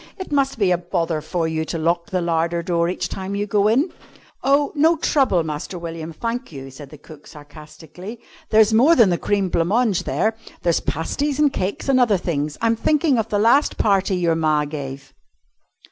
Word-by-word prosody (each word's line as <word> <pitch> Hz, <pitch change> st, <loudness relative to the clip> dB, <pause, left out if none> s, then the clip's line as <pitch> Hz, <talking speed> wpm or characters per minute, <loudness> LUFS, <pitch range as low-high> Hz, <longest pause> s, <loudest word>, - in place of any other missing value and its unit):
"It 375 Hz, -, -8 dB
must 275 Hz, -3 st, +1 dB
be 195 Hz, -4 st, +2 dB
a 175 Hz, -, +2 dB
bother 165 Hz, -2 st, -2 dB
for 165 Hz, +1 st, -2 dB
you 160 Hz, 0 st, -2 dB
to 165 Hz, -, -4 dB
lock 170 Hz, +1 st, 0 dB
the 185 Hz, -3 st, -1 dB
larder 170 Hz, 0 st, -1 dB
door 170 Hz, 0 st, 0 dB
each 180 Hz, -, -3 dB
time 190 Hz, +1 st, -5 dB
you 205 Hz, +1 st, -1 dB
go 205 Hz, 0 st, +2 dB
in?" 270 Hz, -, +2 dB, 0.5 s
"Oh, 280 Hz, +1 st, +2 dB
no 320 Hz, +3 st, +3 dB
trouble, 260 Hz, -, +2 dB
Master 155 Hz, +4 st, -5 dB
William, 165 Hz, -1 st, -6 dB
thank 235 Hz, +8 st, -4 dB
you," 135 Hz, -2 st, -9 dB
said 135 Hz, +1 st, -11 dB
cook 155 Hz, -2 st, -14 dB
sarcastically; 155 Hz, +7 st, -12 dB, 0.3 s
"there's 220 Hz, 0 st, +4 dB
more 270 Hz, +10 st, +5 dB
than 225 Hz, -, +5 dB
the 175 Hz, -, 0 dB
cream 200 Hz, -2 st, 0 dB
blanc 165 Hz, -1 st, 0 dB
mange 220 Hz, -3 st, +1 dB
there; 220 Hz, 0 st, 0 dB, 0.3 s
there's 170 Hz, -2 st, +2 dB
pasties 260 Hz, -, -2 dB
and 295 Hz, -2 st, +2 dB
cakes 190 Hz, +7 st, -3 dB
and 270 Hz, -2 st, +3 dB
other 225 Hz, -5 st, +3 dB
things. 150 Hz, -4 st, -3 dB
I'm 230 Hz, 0 st, +2 dB
thinking 290 Hz, +1 st, +1 dB
of 225 Hz, 0 st, -2 dB
the 205 Hz, -, 0 dB
last 235 Hz, +8 st, +3 dB
party 195 Hz, -2 st, +2 dB
your 170 Hz, -2 st, +1 dB
ma 155 Hz, -2 st, +1 dB
gave!" 135 Hz, -2 st, -7 dB
180 Hz, 190 wpm, -21 LUFS, 160-230 Hz, 0.5 s, more